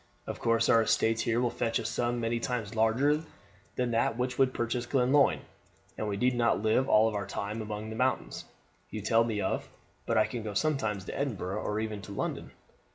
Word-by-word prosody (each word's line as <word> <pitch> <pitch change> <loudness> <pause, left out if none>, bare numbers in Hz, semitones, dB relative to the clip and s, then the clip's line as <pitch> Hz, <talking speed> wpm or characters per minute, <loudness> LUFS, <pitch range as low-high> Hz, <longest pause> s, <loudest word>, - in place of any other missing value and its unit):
Of - - -6
course 115 0 +2
our 115 - +5
estates 110 +1 +2
here 115 0 +1
will 120 -1 +1
fetch 115 - 0
a - - -4
sum 120 +2 -1
many 115 0 -1
times 115 -3 -3
larger 125 +7 +2 0.5
than 125 -1 0
that 115 0 +1
which 125 +1 -2
would 135 -1 +4
purchase 120 0 -2
Glenlyon, 135 +2 +3 0.5
and 110 - -3
we 100 -1 -2
need 125 +4 +2
not 115 -3 +1
live 110 +5 +2
all 110 +1 +5
our 100 0 -3
time 105 +3 -4
among 105 0 -5
the - - -5
mountains 130 +3 -1 0.4
you 110 - -5
tell 115 +2 +3
me 110 -3 -2
of, 95 - -2 0.4
but 110 -2 +3
can 120 -3 -3
go 105 -2 -5
sometimes 110 -9 0
to - - -6
Edinburgh 105 -9 -2
or 105 +1 -2
even 110 -2 -3
to 100 - -9
London. - - -3
115 Hz, 200 wpm, -30 LUFS, 110-125 Hz, 0.5 s, our